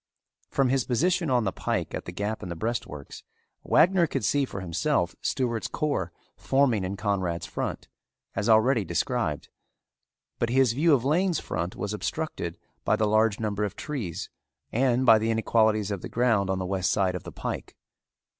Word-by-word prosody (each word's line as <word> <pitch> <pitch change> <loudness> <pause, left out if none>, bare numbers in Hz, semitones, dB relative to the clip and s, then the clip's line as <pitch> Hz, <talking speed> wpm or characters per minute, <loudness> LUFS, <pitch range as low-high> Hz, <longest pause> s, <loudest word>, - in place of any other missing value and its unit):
From 135 -2 +2
his 130 -1 +2
position 170 +6 +1
on 125 -2 +3
the 95 - 0
pike - - -2
at - - -4
the - - -6
gap 105 +4 -3
in 95 - -6
the 85 - -4
breastworks 80 - -4 0.4
Wagner 175 0 +4
could 110 - -2
see 140 +5 +2
for 100 - -7
himself 85 -3 0
Stewart's 120 -4 -1
corps 140 - -1 0.2
forming 130 -7 +2
in 95 +2 -3
Conrad's 95 -5 -1
front, - - -4 0.5
as 100 +4 0
already 110 +1 +4
described, 90 - -1 0.9
but 120 - 0
his 130 -1 +3
view 150 +4 +4
of 125 -1 -2
Lane's 170 +4 +2
front 85 +2 -4
was 105 0 -3
obstructed 105 - -3 0.3
by - - +3
the 110 - +1
large 110 0 +2
number 105 -2 -1
of 105 - -3
trees 120 - -5 0.4
and 125 +1 +2
by 115 -3 +7
the 110 +1 -1
inequalities 110 -2 +2
of 100 -3 -3
the - - -6
ground 110 -5 +2
on 95 - +1
the 95 - -3
west 95 0 0
side 95 -3 +1
of 90 - -4
the - - -9
pike. - - -5
110 Hz, 175 wpm, -27 LUFS, 95-130 Hz, 0.9 s, by